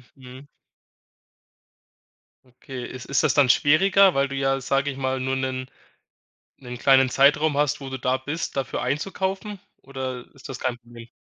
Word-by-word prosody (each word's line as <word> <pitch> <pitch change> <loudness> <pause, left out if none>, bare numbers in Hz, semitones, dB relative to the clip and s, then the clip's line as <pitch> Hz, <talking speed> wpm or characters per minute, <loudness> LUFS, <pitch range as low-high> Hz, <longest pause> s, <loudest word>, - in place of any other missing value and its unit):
Mhm. 130 +1 -13 2.0
Okay, 125 0 -9
ist 125 -1 -9
ist 140 -2 0
das - - +3
dann 140 -4 +4
schwieriger, 190 +8 +5
weil 140 0 +1
du 140 - -5
ja, 135 0 0
sage 135 +2 0
ich 135 - -5
mal, 130 -1 -2
nur 130 +1 -1
'nen 130 0 -3 0.9
'nen 125 -2 -9
kleinen 135 0 +4
Zeitraum 145 +3 +3
hast, 145 0 0
wo 135 - -6
du 130 - -5
da 125 +1 +1
bist, 145 +5 -5
dafür 135 -2 -3
einzukaufen 190 - -3 0.2
oder 130 -2 -6
ist 135 - -13
das 135 - -7
kein 125 -2 -2
Problem? 115 -1 -14
135 Hz, 160 wpm, -24 LUFS, 130-145 Hz, 2.0 s, schwieriger